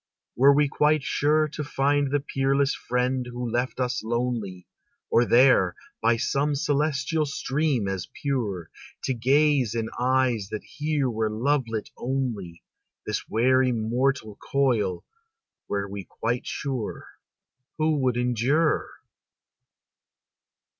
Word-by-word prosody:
Were 135 Hz, +3 st, +6 dB
we 145 Hz, +1 st, +4 dB
quite 150 Hz, +1 st, +2 dB
sure 155 Hz, +3 st, +2 dB
To 150 Hz, 0 st, -5 dB
find 145 Hz, 0 st, +1 dB
the 145 Hz, +1 st, +1 dB
peerless 135 Hz, 0 st, +1 dB
friend 125 Hz, +1 st, -1 dB
who 125 Hz, 0 st, -4 dB
left 125 Hz, +2 st, -1 dB
us 125 Hz, -3 st, -1 dB
lonely, 115 Hz, -6 st, -2 dB, 0.5 s
Or 120 Hz, -, +4 dB
there, 120 Hz, -8 st, +5 dB, 0.3 s
by 115 Hz, +1 st, +3 dB
some 140 Hz, +4 st, 0 dB
celestial 145 Hz, +2 st, 0 dB
stream 140 Hz, -4 st, -1 dB
as 95 Hz, -2 st, -3 dB
pure, 110 Hz, -, -3 dB, 0.3 s
To 130 Hz, -, 0 dB
gaze 135 Hz, -1 st, +2 dB
in 115 Hz, -1 st, -2 dB
eyes 125 Hz, -4 st, +1 dB
that 105 Hz, -, -5 dB
here 150 Hz, -2 st, -1 dB
were 110 Hz, -2 st, -1 dB
lovelit 115 Hz, -1 st, -1 dB
only, 120 Hz, -10 st, -3 dB, 0.4 s
This -, -, -3 dB
weary 130 Hz, +3 st, +3 dB
mortal 120 Hz, -1 st, -1 dB
coil, 115 Hz, -10 st, 0 dB, 0.6 s
were 100 Hz, 0 st, -2 dB
we 100 Hz, -1 st, -7 dB
quite 120 Hz, +2 st, -3 dB
sure, 130 Hz, -6 st, -4 dB, 0.7 s
Who 155 Hz, -1 st, +2 dB
would 130 Hz, -3 st, +1 dB
endure? 125 Hz, +6 st, +1 dB
130 Hz, 120 wpm, -25 LUFS, 115-140 Hz, 0.7 s, Were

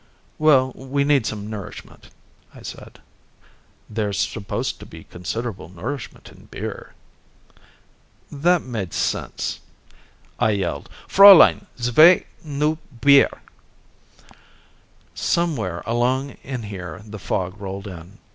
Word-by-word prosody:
"Well, 135 Hz, -4 st, +4 dB
we 135 Hz, +2 st, -2 dB
need 140 Hz, -4 st, +2 dB
some 105 Hz, -1 st, -5 dB
nourishment," 105 Hz, -3 st, -9 dB, 0.5 s
I -, -, -13 dB
said. -, -, -10 dB, 0.9 s
"There's 105 Hz, -2 st, -2 dB
supposed 105 Hz, -3 st, -3 dB
to -, -, -11 dB
be -, -, -12 dB
considerable 95 Hz, 0 st, -6 dB
nourishment 115 Hz, +10 st, -7 dB
in -, -, -18 dB
beer." -, -, -7 dB, 1.4 s
That 170 Hz, +4 st, +2 dB
made 110 Hz, -9 st, -5 dB
sense. -, -, -2 dB, 0.8 s
I 110 Hz, -, +3 dB
yelled, 95 Hz, -3 st, -3 dB, 0.2 s
"Fräulein! 195 Hz, -2 st, +8 dB
Zwei 155 Hz, +9 st, +6 dB, 0.2 s
neu 150 Hz, +1 st, -1 dB, 0.2 s
bier!" 140 Hz, +1 st, +4 dB, 1.7 s
Somewhere 125 Hz, -, -1 dB
along 125 Hz, +4 st, 0 dB
in 130 Hz, -3 st, -6 dB
here 95 Hz, -1 st, -8 dB
the 105 Hz, -1 st, -9 dB
fog 95 Hz, +2 st, -3 dB
rolled 95 Hz, 0 st, -6 dB
in. 90 Hz, +1 st, -10 dB
115 Hz, 105 wpm, -22 LUFS, 100-140 Hz, 1.7 s, Fräulein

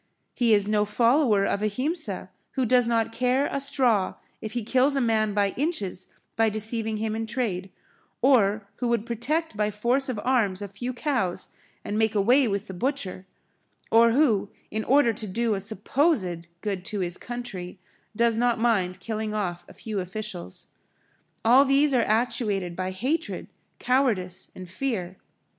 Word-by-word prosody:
He 235 Hz, -3 st, +4 dB
is 205 Hz, -1 st, +2 dB
no 210 Hz, 0 st, +2 dB
follower 230 Hz, 0 st, +3 dB
of 200 Hz, -, -1 dB
Ahimsa 275 Hz, -, -2 dB, 0.2 s
who 260 Hz, -2 st, 0 dB
does 245 Hz, 0 st, +4 dB
not 230 Hz, -1 st, +1 dB
care 255 Hz, +3 st, +1 dB
a 275 Hz, -, -2 dB
straw 255 Hz, -8 st, +1 dB, 0.3 s
if 220 Hz, 0 st, -6 dB
he 240 Hz, -2 st, -2 dB
kills 260 Hz, +5 st, +3 dB
a -, -, +2 dB
man 220 Hz, -4 st, +1 dB
by 200 Hz, -1 st, +3 dB
inches 205 Hz, -, -3 dB, 0.3 s
by 225 Hz, -1 st, +3 dB
deceiving 220 Hz, +1 st, -2 dB
him 220 Hz, 0 st, -2 dB
in 225 Hz, 0 st, -3 dB
trade, 215 Hz, -6 st, -2 dB, 0.5 s
or 215 Hz, -6 st, +3 dB
who 245 Hz, -, -1 dB
would 235 Hz, -2 st, 0 dB
protect 250 Hz, +6 st, -2 dB
by 210 Hz, 0 st, +1 dB
force 240 Hz, +6 st, 0 dB
of 235 Hz, -5 st, -2 dB
arms 225 Hz, -7 st, +1 dB
a -, -, -4 dB
few 240 Hz, +6 st, -5 dB
cows 245 Hz, -, -2 dB, 0.4 s
and 210 Hz, +1 st, -2 dB
make 220 Hz, -1 st, +1 dB
away 245 Hz, +6 st, +4 dB
with 200 Hz, 0 st, -2 dB
the 190 Hz, -, -8 dB
butcher 195 Hz, -4 st, -3 dB, 0.6 s
or 230 Hz, 0 st, +6 dB
who, 230 Hz, -8 st, +3 dB, 0.2 s
in 220 Hz, +1 st, -2 dB
order 270 Hz, -3 st, +4 dB
to 215 Hz, 0 st, -5 dB
do 225 Hz, +3 st, 0 dB
a 200 Hz, -, -1 dB
supposed 200 Hz, -, 0 dB
good 195 Hz, -4 st, -3 dB
to 205 Hz, -1 st, -3 dB
his 175 Hz, 0 st, -3 dB
country, 225 Hz, -7 st, -6 dB, 0.4 s
does 235 Hz, 0 st, +3 dB
not 240 Hz, +1 st, +2 dB
mind 195 Hz, -6 st, +1 dB
killing 215 Hz, +1 st, -3 dB
off 175 Hz, -4 st, -3 dB
a -, -, -12 dB
few 215 Hz, -3 st, -4 dB
officials. 185 Hz, -, -6 dB, 0.8 s
All 250 Hz, +4 st, +7 dB
these 280 Hz, +1 st, +3 dB
are 250 Hz, -, +4 dB
actuated 210 Hz, -5 st, 0 dB
by 185 Hz, +1 st, -2 dB
hatred, 270 Hz, -, -2 dB, 0.3 s
cowardice 220 Hz, -9 st, 0 dB
and 185 Hz, -1 st, -9 dB
fear. 185 Hz, -3 st, -3 dB
220 Hz, 165 wpm, -26 LUFS, 200-250 Hz, 0.8 s, All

